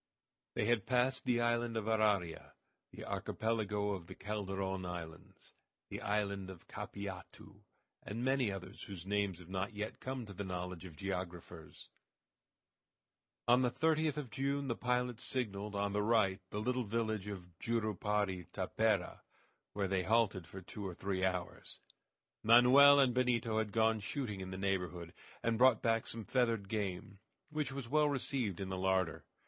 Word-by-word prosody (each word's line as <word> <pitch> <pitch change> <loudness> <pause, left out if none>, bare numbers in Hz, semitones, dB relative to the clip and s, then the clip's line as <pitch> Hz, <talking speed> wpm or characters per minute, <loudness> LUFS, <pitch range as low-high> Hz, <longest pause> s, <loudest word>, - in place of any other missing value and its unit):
They - - +1
had 115 -3 +2
passed 130 +1 +2
the 120 -1 +2
island 120 -1 +1
of 110 - -2
Araria, 105 -6 +1 0.4
the - - -9
Archipelago 105 -2 -1
of 90 -4 -5
the 95 - -9
Calderon 95 -2 -3
islands, 85 -3 -8 0.4
the - - -5
island 100 -2 -1
of 95 -3 -11
Capiatu, 100 -2 -8 0.4
and 115 +4 -4
many 130 -5 +2
others 95 0 -7
whose 95 -3 -7
names 100 -2 0
have 90 -2 -13
not 95 +3 -3
yet 105 +1 -4
come 130 -2 -4
to 100 - -9
the 100 - -4
knowledge 90 -1 -5
of 80 -4 -10
geographers. 90 -4 -6 1.6
On 125 +2 +6
the 125 - +3
30th 155 +1 +1
of 140 -5 -4
June 140 0 -1
the 115 - +1
pilot 125 -1 0
signaled 105 -5 -3
on 100 0 0
the 105 - +1
right 105 -3 +3
the 105 - -3
little 125 +3 0
village 110 -2 -1
of 90 -4 -8
Jurupari 105 -4 0
Tapera, - - 0 0.5
where 100 -1 0
they 95 0 +1
halted 105 -5 +2
for 95 +2 -8
two 105 +3 -7
or 95 -3 -4
three 95 0 -2
hours. 90 -1 -2 0.6
Manoel 130 +5 +8
and 130 -3 +5
Benito 120 -3 +2
had 105 -2 -1
gone 110 0 +3
shooting 105 -2 -3
in 95 - -5
the 95 - -5
neighborhood, 90 -3 -2 0.3
and 115 -1 +1
brought 130 -3 +6
back 115 -1 +2
some 115 -2 -4
feathered 115 -6 +1
game, 100 -1 -3 0.3
which 150 -4 -1
was 135 -3 -5
well 150 +3 +3
received 130 - -1
in 95 -1 -3
the 95 -1 -3
larder. 95 -2 +1
105 Hz, 160 wpm, -35 LUFS, 95-120 Hz, 1.6 s, Manoel